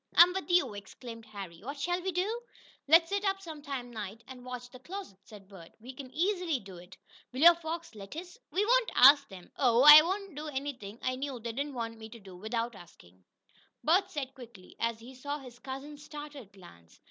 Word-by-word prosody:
"I'm 355 Hz, +1 st, +8 dB
with 380 Hz, 0 st, -4 dB
you!" 350 Hz, -10 st, +3 dB
exclaimed 225 Hz, +3 st, -10 dB
Harry. 195 Hz, -6 st, -9 dB
"What 280 Hz, +6 st, -7 dB
shall 350 Hz, +5 st, -1 dB
we 380 Hz, +1 st, -2 dB
do?" 405 Hz, +7 st, -1 dB, 0.5 s
"Let's 330 Hz, +3 st, +6 dB
sit 400 Hz, 0 st, -1 dB
up 390 Hz, -1 st, 0 dB
some 320 Hz, -5 st, -9 dB, 0.3 s
night 215 Hz, 0 st, -7 dB
and 255 Hz, -1 st, -11 dB
watch 250 Hz, -1 st, -7 dB
that 255 Hz, 0 st, -14 dB
closet," 370 Hz, -, -8 dB
said 205 Hz, -3 st, -14 dB
Bert. 185 Hz, -4 st, -14 dB
"We 250 Hz, +4 st, -10 dB
can 260 Hz, 0 st, -9 dB
easily 355 Hz, -3 st, 0 dB
do 195 Hz, -4 st, -12 dB
it." 180 Hz, +2 st, -14 dB, 0.3 s
"Will 255 Hz, +2 st, -5 dB
your 340 Hz, +2 st, +10 dB
folks 335 Hz, -1 st, -6 dB
let 200 Hz, +3 st, -10 dB
us?" 355 Hz, +4 st, -8 dB
"We 405 Hz, +3 st, +1 dB
won't -, -, +3 dB
ask 280 Hz, +2 st, +8 dB
them. 185 Hz, -3 st, -12 dB
Oh, 245 Hz, -2 st, +4 dB
I 300 Hz, +1 st, +13 dB
wouldn't 385 Hz, +3 st, -3 dB
do 300 Hz, +2 st, -6 dB
anything 265 Hz, -7 st, -5 dB
I 255 Hz, 0 st, -1 dB
knew 270 Hz, -2 st, -4 dB
they 230 Hz, +1 st, -5 dB
didn't 280 Hz, +4 st, -4 dB
want 230 Hz, -1 st, -5 dB
me 220 Hz, 0 st, -9 dB
to 230 Hz, -, -12 dB
do 190 Hz, -3 st, -13 dB
without 230 Hz, +5 st, -3 dB
asking," 95 Hz, -, -17 dB, 0.6 s
Bert 370 Hz, +5 st, +3 dB
said 280 Hz, -7 st, -5 dB
quickly, 235 Hz, -8 st, -14 dB
as 230 Hz, -1 st, -1 dB
he 240 Hz, +3 st, -12 dB
saw 285 Hz, +3 st, -5 dB
his 250 Hz, -4 st, -13 dB
cousin's 285 Hz, +3 st, -8 dB
startled 295 Hz, -7 st, -9 dB
glance. 85 Hz, -, -17 dB
265 Hz, 205 wpm, -30 LUFS, 220-330 Hz, 0.6 s, I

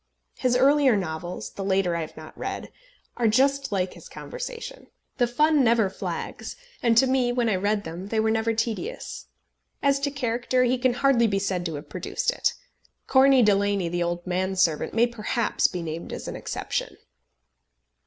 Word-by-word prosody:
His 250 Hz, -1 st, +2 dB
earlier 270 Hz, -2 st, +4 dB
novels 175 Hz, -1 st, -5 dB
the 195 Hz, -, -6 dB
later 190 Hz, -2 st, +1 dB
I 170 Hz, -, -1 dB
have 155 Hz, -, -8 dB
not 155 Hz, 0 st, -11 dB
read -, -, -5 dB, 0.5 s
are 240 Hz, -2 st, +2 dB
just 275 Hz, +4 st, +2 dB
like 190 Hz, -2 st, -1 dB
his -, -, -13 dB
conversation. -, -, -7 dB, 0.3 s
The 245 Hz, -2 st, +3 dB
fun 300 Hz, +4 st, +3 dB
never 225 Hz, -5 st, +3 dB
flags, -, -, -5 dB, 0.3 s
and 230 Hz, -2 st, +3 dB
to 265 Hz, -, +7 dB
me, 255 Hz, -2 st, +2 dB
when 245 Hz, -1 st, +1 dB
I 205 Hz, -, +2 dB
read 205 Hz, +2 st, 0 dB
them, 170 Hz, +4 st, -7 dB
they 220 Hz, +1 st, -1 dB
were 220 Hz, 0 st, +2 dB
never 225 Hz, +1 st, +1 dB
tedious. 235 Hz, -, -4 dB, 0.6 s
As 280 Hz, 0 st, +3 dB
to 280 Hz, +1 st, 0 dB
character 250 Hz, -2 st, 0 dB
he 250 Hz, 0 st, +1 dB
can 255 Hz, 0 st, +2 dB
hardly 250 Hz, -3 st, +3 dB
be 200 Hz, -2 st, 0 dB
said 190 Hz, -3 st, -1 dB
to 160 Hz, -, -4 dB
have 145 Hz, -, -8 dB
produced -, -, -2 dB
it. -, -, 0 dB, 0.5 s
Corney 265 Hz, -1 st, +5 dB
Delaney, 200 Hz, -3 st, +2 dB
the 175 Hz, +1 st, -2 dB
old 175 Hz, 0 st, -2 dB
man 185 Hz, +1 st, -1 dB
servant, 165 Hz, -2 st, +1 dB
may 235 Hz, +1 st, +5 dB
perhaps 235 Hz, 0 st, 0 dB
be 180 Hz, -2 st, -5 dB
named 165 Hz, +1 st, -5 dB
as -, -, -6 dB
an -, -, -5 dB
exception. -, -, -4 dB
225 Hz, 180 wpm, -25 LUFS, 185-255 Hz, 0.6 s, to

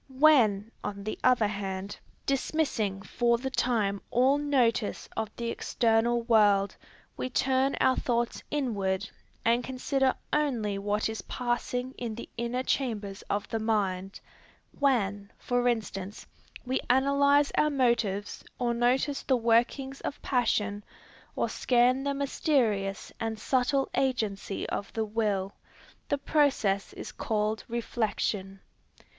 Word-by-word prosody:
When, 230 Hz, -8 st, +5 dB
on 200 Hz, -1 st, -5 dB
the 215 Hz, -, -4 dB
other 250 Hz, -4 st, +4 dB
hand, 200 Hz, -1 st, -4 dB, 0.3 s
dismissing 255 Hz, -8 st, 0 dB
for 235 Hz, +2 st, +1 dB
the 265 Hz, +2 st, -4 dB
time 215 Hz, -6 st, 0 dB
all 265 Hz, +4 st, +3 dB
notice 250 Hz, -7 st, +1 dB
of 220 Hz, -1 st, -2 dB
the 235 Hz, -1 st, -3 dB
external 235 Hz, +1 st, +1 dB
world, 205 Hz, -4 st, +4 dB, 0.4 s
we 255 Hz, -, -3 dB
turn 265 Hz, +1 st, +1 dB
our 260 Hz, 0 st, +4 dB
thoughts 235 Hz, -1 st, -1 dB
inward, 200 Hz, -9 st, -1 dB, 0.4 s
and 235 Hz, +2 st, +3 dB
consider 265 Hz, +1 st, 0 dB, 0.2 s
only 235 Hz, -10 st, 0 dB
what 205 Hz, +1 st, 0 dB
is 220 Hz, 0 st, -4 dB
passing 250 Hz, +1 st, -2 dB
in 230 Hz, -3 st, -4 dB
the 235 Hz, -, -7 dB
inner 235 Hz, +2 st, -2 dB
chambers 210 Hz, -8 st, -2 dB
of 205 Hz, 0 st, -1 dB
the 225 Hz, -, -1 dB
mind, 195 Hz, -4 st, -1 dB, 0.6 s
when, 205 Hz, -8 st, +1 dB
for 245 Hz, 0 st, 0 dB
instance, 210 Hz, -4 st, -2 dB, 0.4 s
we 260 Hz, +1 st, 0 dB
analyze 280 Hz, +2 st, +4 dB
our 300 Hz, -, +3 dB
motives, 235 Hz, -7 st, 0 dB
or 240 Hz, -1 st, 0 dB
notice 255 Hz, +4 st, +1 dB
the 260 Hz, -, +2 dB
workings 240 Hz, +4 st, +1 dB
of 285 Hz, -, -4 dB
passion, 210 Hz, -5 st, 0 dB, 0.5 s
or -, -, 0 dB
scan 250 Hz, +2 st, +2 dB
the 280 Hz, 0 st, 0 dB
mysterious 235 Hz, -, 0 dB
and 225 Hz, -1 st, -2 dB
subtle 260 Hz, +4 st, +1 dB
agency 215 Hz, -7 st, -1 dB
of 200 Hz, -, -4 dB
the 220 Hz, -1 st, -1 dB
will, 205 Hz, -3 st, -1 dB, 0.6 s
the 285 Hz, -, +2 dB
process 270 Hz, -10 st, +1 dB
is -, -, -7 dB
called 215 Hz, 0 st, -1 dB
reflection. 210 Hz, -4 st, -2 dB
235 Hz, 125 wpm, -28 LUFS, 205-260 Hz, 0.6 s, When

